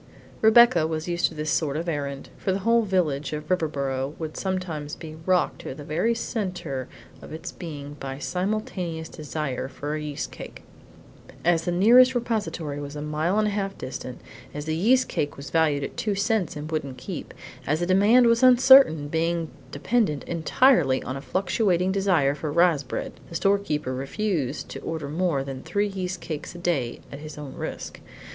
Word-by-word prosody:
III -, -, -23 dB
Rebecca 220 Hz, -7 st, +6 dB
was 160 Hz, 0 st, -3 dB
used 175 Hz, 0 st, +1 dB
to 160 Hz, -, -10 dB
this 150 Hz, 0 st, -2 dB
sort 150 Hz, -3 st, 0 dB
of 165 Hz, +2 st, -3 dB
errand, 140 Hz, -4 st, -3 dB
for 190 Hz, -, -2 dB
the 190 Hz, -, +1 dB
whole 230 Hz, 0 st, +5 dB
village 170 Hz, -9 st, 0 dB
of 150 Hz, 0 st, -5 dB
Riverboro 140 Hz, -5 st, -1 dB
would 160 Hz, -2 st, -5 dB
sometimes 175 Hz, -6 st, -3 dB
be 155 Hz, -1 st, -9 dB
rocked 185 Hz, -1 st, +2 dB
to -, -, -6 dB
the 145 Hz, -, -9 dB
very 175 Hz, +11 st, 0 dB
centre 180 Hz, -, -3 dB, 0.3 s
of -, -, -11 dB
its 160 Hz, +1 st, -6 dB
being 145 Hz, -4 st, -7 dB
by 135 Hz, 0 st, -5 dB
simultaneous 180 Hz, -1 st, -3 dB
desire 150 Hz, -4 st, -4 dB
for 145 Hz, +2 st, -5 dB
a 155 Hz, -, -3 dB
yeast 150 Hz, -1 st, -4 dB
cake. -, -, -10 dB, 0.8 s
As 165 Hz, -1 st, +3 dB
the 175 Hz, -, 0 dB
nearest 245 Hz, +8 st, +6 dB
repository 210 Hz, -11 st, -2 dB
was 145 Hz, 0 st, -7 dB
a 145 Hz, -, -5 dB
mile 155 Hz, +6 st, 0 dB
and 215 Hz, 0 st, +3 dB
a -, -, -3 dB
half 195 Hz, -1 st, -2 dB
distant, 130 Hz, -1 st, -6 dB, 0.4 s
as 150 Hz, 0 st, -4 dB
the 155 Hz, 0 st, -1 dB
yeast 245 Hz, +10 st, +3 dB
cake 145 Hz, -, -2 dB
was 140 Hz, -1 st, -8 dB
valued 155 Hz, -4 st, +2 dB
at -, -, -6 dB
two 210 Hz, -2 st, 0 dB
cents 200 Hz, -3 st, 0 dB
and 150 Hz, +2 st, -6 dB
wouldn't 140 Hz, -5 st, -3 dB
keep, 125 Hz, -, -6 dB, 0.4 s
as 155 Hz, +2 st, +1 dB
the 175 Hz, -, 0 dB
demand 205 Hz, +7 st, +5 dB
was 230 Hz, +1 st, +4 dB
uncertain, 255 Hz, -, +7 dB
being 165 Hz, +1 st, -1 dB, 0.2 s
dependent 150 Hz, -, 0 dB
entirely 170 Hz, -, +3 dB
on 130 Hz, -, -4 dB
a 135 Hz, -, -5 dB
fluctuating 185 Hz, +1 st, +1 dB
desire 185 Hz, -8 st, +2 dB
for 150 Hz, 0 st, -4 dB
"riz 170 Hz, -2 st, +3 dB
bread," -, -, -5 dB
the 165 Hz, -, -9 dB
storekeeper 165 Hz, -8 st, +1 dB
refused 145 Hz, -, -2 dB
to -, -, -6 dB
order 160 Hz, -3 st, -4 dB
more 155 Hz, -2 st, 0 dB
than 135 Hz, -1 st, -6 dB
three 205 Hz, 0 st, -1 dB
yeast 185 Hz, -2 st, -4 dB
cakes 165 Hz, +2 st, -6 dB
a -, -, -7 dB
day 155 Hz, -9 st, -1 dB
at 140 Hz, -, -7 dB
his 155 Hz, 0 st, -9 dB
own 145 Hz, -3 st, -7 dB
risk. -, -, -6 dB
160 Hz, 185 wpm, -25 LUFS, 145-195 Hz, 0.8 s, uncertain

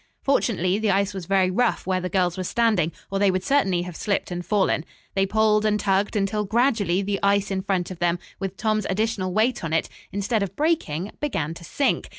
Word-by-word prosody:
Fortunately 200 Hz, -8 st, +1 dB
the 220 Hz, -1 st, +1 dB
ice 200 Hz, +1 st, +2 dB
was 185 Hz, -4 st, -6 dB
very 190 Hz, -1 st, +3 dB
rough 245 Hz, +5 st, +1 dB
where 185 Hz, -1 st, 0 dB
the 180 Hz, -, -3 dB
girls 180 Hz, -3 st, +1 dB
were 185 Hz, -, -3 dB
standing, 210 Hz, -5 st, +1 dB, 0.2 s
or 195 Hz, -, 0 dB
they 200 Hz, -1 st, +4 dB
would 185 Hz, 0 st, 0 dB
certainly 195 Hz, -11 st, +2 dB
have 180 Hz, -2 st, -8 dB
slipped 200 Hz, -1 st, -1 dB
and 175 Hz, 0 st, -3 dB
fallen. 195 Hz, -6 st, +1 dB, 0.3 s
They 195 Hz, 0 st, +1 dB
pulled 215 Hz, +1 st, +3 dB
and 210 Hz, -1 st, +2 dB
tugged 200 Hz, +2 st, +1 dB
until 210 Hz, +1 st, 0 dB
gradually 210 Hz, -4 st, +1 dB
the 200 Hz, 0 st, -1 dB
ice 200 Hz, 0 st, +2 dB
in 190 Hz, -1 st, -1 dB
front 185 Hz, -2 st, -1 dB
of 180 Hz, -, -8 dB
them, 175 Hz, 0 st, +1 dB, 0.2 s
with 195 Hz, -1 st, -4 dB
Tom's 215 Hz, -2 st, 0 dB
additional 195 Hz, -2 st, -1 dB
weight 220 Hz, +4 st, +1 dB
on 160 Hz, -1 st, -3 dB
it, 160 Hz, -, +1 dB, 0.2 s
instead 200 Hz, +3 st, 0 dB
of 200 Hz, -1 st, -3 dB
breaking 210 Hz, -, 0 dB
began 165 Hz, -, -2 dB
to 170 Hz, -, -11 dB
sink. 275 Hz, -, 0 dB
195 Hz, 210 wpm, -24 LUFS, 185-215 Hz, 0.3 s, they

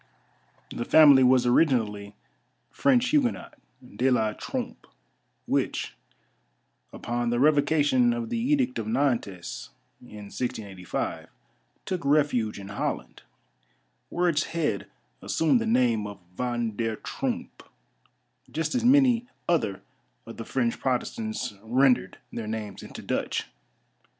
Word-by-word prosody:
The -, -, -3 dB
family 145 Hz, -2 st, +7 dB
was 125 Hz, 0 st, +5 dB
originally 110 Hz, -7 st, +1 dB, 0.6 s
French 255 Hz, -1 st, +3 dB
Huguenot 280 Hz, -6 st, 0 dB, 0.2 s
— 125 Hz, -5 st, -17 dB
De 130 Hz, +4 st, +3 dB
la 110 Hz, -4 st, +2 dB
Trompe -, -, -6 dB, 0.3 s
— -, -, -47 dB
which, -, -, -1 dB, 1.0 s
upon 120 Hz, 0 st, -2 dB
the 120 Hz, 0 st, 0 dB
revocation 155 Hz, -, +3 dB
of 240 Hz, -1 st, -3 dB
the 235 Hz, -, 0 dB
Edict 260 Hz, +1 st, +1 dB
of -, -, -4 dB
Nantes 120 Hz, -, -1 dB, 0.3 s
in 105 Hz, -4 st, -11 dB
1685, 100 Hz, -7 st, -4 dB, 0.6 s
took 185 Hz, -4 st, -3 dB
refuge 140 Hz, -6 st, +2 dB
in 100 Hz, 0 st, -9 dB
Holland, 100 Hz, -, -4 dB, 0.9 s
where 180 Hz, +1 st, 0 dB
its 155 Hz, -3 st, +2 dB
head 160 Hz, -11 st, -2 dB, 0.3 s
assumed 165 Hz, +9 st, +2 dB
the 230 Hz, -, -2 dB
name 120 Hz, -, +2 dB
of 100 Hz, -1 st, -9 dB, 0.2 s
Van 120 Hz, -2 st, -2 dB
der 115 Hz, 0 st, -1 dB
Troomp, -, -, -4 dB, 0.9 s
just 160 Hz, -1 st, -2 dB
as 250 Hz, -, 0 dB
many 250 Hz, -2 st, +4 dB, 0.2 s
other 100 Hz, -, 0 dB, 0.4 s
of 115 Hz, -, -10 dB
the 115 Hz, -, -6 dB
French 120 Hz, -3 st, -1 dB
Protes 125 Hz, -2 st, -1 dB
tants 220 Hz, -, -4 dB
rendered 125 Hz, +3 st, +2 dB, 0.2 s
their 110 Hz, -2 st, -4 dB
names 110 Hz, -2 st, -5 dB
into -, -, -10 dB
Dutch. -, -, -2 dB
130 Hz, 125 wpm, -26 LUFS, 110-175 Hz, 1.0 s, family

